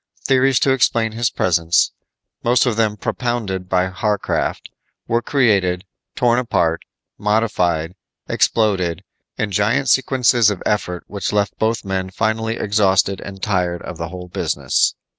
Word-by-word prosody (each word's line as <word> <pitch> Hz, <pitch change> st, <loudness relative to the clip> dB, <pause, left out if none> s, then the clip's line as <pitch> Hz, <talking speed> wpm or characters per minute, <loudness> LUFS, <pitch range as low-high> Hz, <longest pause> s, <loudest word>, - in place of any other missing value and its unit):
Theories 135 Hz, 0 st, +3 dB
to 135 Hz, -, +3 dB
explain 115 Hz, -4 st, +2 dB
his 115 Hz, +1 st, 0 dB
presence 85 Hz, -1 st, +2 dB, 0.5 s
most 120 Hz, +2 st, +3 dB
of 120 Hz, -3 st, 0 dB
them 110 Hz, -2 st, +1 dB
propounded 105 Hz, -6 st, -3 dB
by 90 Hz, 0 st, +2 dB
Warcraft 105 Hz, -2 st, -1 dB, 0.4 s
were 115 Hz, +1 st, +1 dB
created, 100 Hz, -10 st, +1 dB, 0.3 s
torn 120 Hz, -1 st, +3 dB
apart, 85 Hz, -9 st, 0 dB, 0.4 s
modified, 100 Hz, -6 st, 0 dB, 0.3 s
exploded, 95 Hz, -7 st, +1 dB, 0.3 s
in 105 Hz, -2 st, -2 dB
giant 105 Hz, +7 st, +1 dB
sequences 125 Hz, -3 st, +3 dB
of 100 Hz, -4 st, -4 dB
effort 90 Hz, -4 st, -1 dB
which 100 Hz, -1 st, -4 dB
left 105 Hz, -1 st, 0 dB
both 110 Hz, 0 st, 0 dB
men 95 Hz, -1 st, -2 dB
finally 110 Hz, +3 st, -1 dB
exhausted 100 Hz, -2 st, +2 dB
and 95 Hz, -1 st, -9 dB
tired 90 Hz, -4 st, -1 dB
of 85 Hz, -, -8 dB
the 85 Hz, -, -3 dB
whole 90 Hz, 0 st, -8 dB
business. 70 Hz, -6 st, 0 dB
105 Hz, 135 wpm, -19 LUFS, 90-115 Hz, 0.5 s, Theories